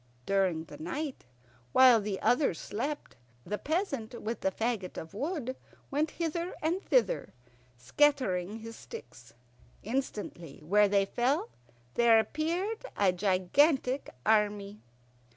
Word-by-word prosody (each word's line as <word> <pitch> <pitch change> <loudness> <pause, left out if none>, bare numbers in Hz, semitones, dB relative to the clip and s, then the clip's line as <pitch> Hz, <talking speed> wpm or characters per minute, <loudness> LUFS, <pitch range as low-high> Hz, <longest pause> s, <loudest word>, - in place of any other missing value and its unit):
During 190 -5 +1
the 145 -2 -12
night, 270 - -4 0.5
while 250 -4 +7
the 200 -2 -3
others 245 - +2
slept, 280 - -4 0.3
the 210 - -3
peasant 275 - -2
with 225 +2 -4
the - - +2
fagot 220 -2 -2
of 160 - -7
wood 270 - -3 0.4
went 300 +3 +1
hither 340 +2 -3
and 335 +5 0
thither, - - +1 0.4
scattering 210 - +1
his 230 0 -8
sticks. 125 - -11 0.5
Instantly 210 - -4
where 205 +5 +5
they 200 0 +3
fell 245 +8 0 0.4
there 235 -1 +6
appeared 335 - -1
a 200 -2 +4
gigantic 250 - +2 0.2
army. 210 -1 +1
225 Hz, 115 wpm, -30 LUFS, 195-295 Hz, 0.5 s, while